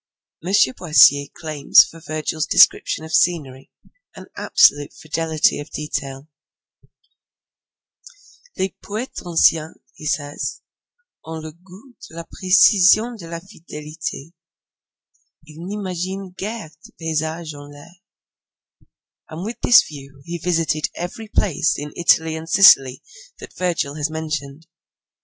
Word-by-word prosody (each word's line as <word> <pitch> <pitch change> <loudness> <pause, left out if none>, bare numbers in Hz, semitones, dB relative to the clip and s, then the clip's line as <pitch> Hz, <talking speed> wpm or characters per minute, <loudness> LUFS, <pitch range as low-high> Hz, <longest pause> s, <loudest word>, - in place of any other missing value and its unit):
M. 180 - -4 0.3
Boissier 145 -4 +5
claims 155 -3 +4
for 165 - -13
Virgil's 155 0 -4
descriptions 160 - +3
of 160 - -10
scenery 140 -6 0 0.5
an - - -11
absolute 145 0 +3
fidelity 160 0 -1
of 145 - -8
detail. 140 -2 -6 2.3
'Les 190 0 -2
poetes 220 +5 -6
anciens,' 165 -2 +2 0.2
he 155 - -9
says, 145 -1 -3 0.6
'ont 160 0 -8
le 155 - -8
gout 185 - -18 0.2
de - - -15
la 170 - -6
precision 200 +5 +4
et 230 - -12
de 170 - -10
la 170 0 -6
fidelite: 160 -4 -9 1.1
ils 155 +1 -14
n'imaginent 190 0 -5
guere 205 -4 -6
de - - -15
paysages 160 0 -4
en 145 0 -11
l'air,' 165 +5 -16 1.3
and 165 +4 -7
with 230 +2 -7
this 240 - +6
view 140 -2 -13
he 170 0 -6
visited 165 -3 -1
every 180 +6 -7
place 175 -7 0
in 145 0 -7
Italy 160 -2 +2
and 160 +1 -8
Sicily 135 -9 +5 0.3
that - - -12
Virgil 170 -6 -2
has 150 0 -3
mentioned. 155 -1 -6
160 Hz, 120 wpm, -20 LUFS, 150-180 Hz, 2.3 s, this